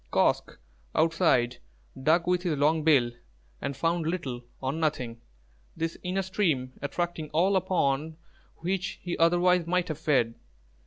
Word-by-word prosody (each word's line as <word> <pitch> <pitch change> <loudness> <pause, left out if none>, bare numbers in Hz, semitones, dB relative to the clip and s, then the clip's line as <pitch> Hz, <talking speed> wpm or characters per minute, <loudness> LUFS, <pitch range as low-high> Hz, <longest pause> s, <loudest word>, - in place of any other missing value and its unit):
Kosq' - - +1 0.4
outside 160 -7 +3 0.4
dug 160 +5 +3
with 180 0 +2
his 170 -5 -1
long 155 +2 +2
bill 135 -7 +4 0.5
and 140 - -3
found 165 +2 0
little 135 -8 -3 0.2
or 130 +1 -2
nothing, 135 -8 -2 0.6
this 165 0 -2
inner 190 +1 -1
stream 165 -10 0
attracting 160 +2 -3
all 185 +5 +3
upon 155 -4 0 0.4
which 185 +2 -2
he 175 -1 -2
otherwise 175 +1 +4
might 180 0 +1
have 155 -1 -4
fed. 135 -8 +2
165 Hz, 135 wpm, -28 LUFS, 140-175 Hz, 0.6 s, bill